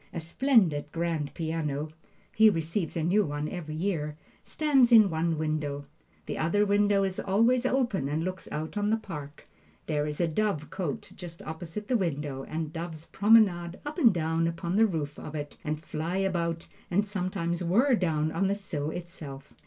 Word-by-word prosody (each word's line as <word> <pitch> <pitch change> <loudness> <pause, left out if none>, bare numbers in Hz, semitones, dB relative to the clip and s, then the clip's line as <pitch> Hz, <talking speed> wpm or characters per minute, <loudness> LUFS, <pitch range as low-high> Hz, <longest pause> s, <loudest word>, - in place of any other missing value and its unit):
A 170 - -4
splendid 165 - +2
grand 165 -3 -2
piano 155 -2 -2 0.4
(he 220 0 +7
receives 165 -1 -2
a 160 - 0
new 195 +6 +3
one 145 -2 -3
every 155 -3 -5
year,) 155 -4 -2 0.3
stands 275 -6 +3
in 215 -5 +7
one 160 0 0
window. 150 -2 -2 0.4
The - - -4
other 205 +6 +2
window 205 0 +3
is 190 -1 -2
always 235 +6 +3
open 235 - 0
and 155 +2 -1
looks 185 0 -5
out 155 +6 -4
on 205 0 +1
the 220 - +3
park. 150 -9 -9 0.4
There 150 -1 0
is 150 0 -4
a 175 - +2
dovecote 165 -3 -2
just 170 -2 -9
opposite 165 +6 -6
the 250 - +3
window, 145 -7 -2
and 160 +1 -4
doves 165 -1 -6
promenade 195 -5 +3
up 305 +4 -4
and 235 -8 +7
down 165 -1 0
upon 170 +2 -3
the 220 +2 +5
roof 150 -6 -4
of 155 - -7
it, 145 -1 -5
and 155 0 -2
fly 165 +3 -3
about, 170 -4 -1 0.2
and 200 +4 +2
sometimes 180 -3 -2
whirr 235 +11 +3
down 160 -7 +1
on 195 - +1
the 200 - +1
sill 155 -7 -3
itself. 155 -5 -8
170 Hz, 175 wpm, -28 LUFS, 155-200 Hz, 0.4 s, he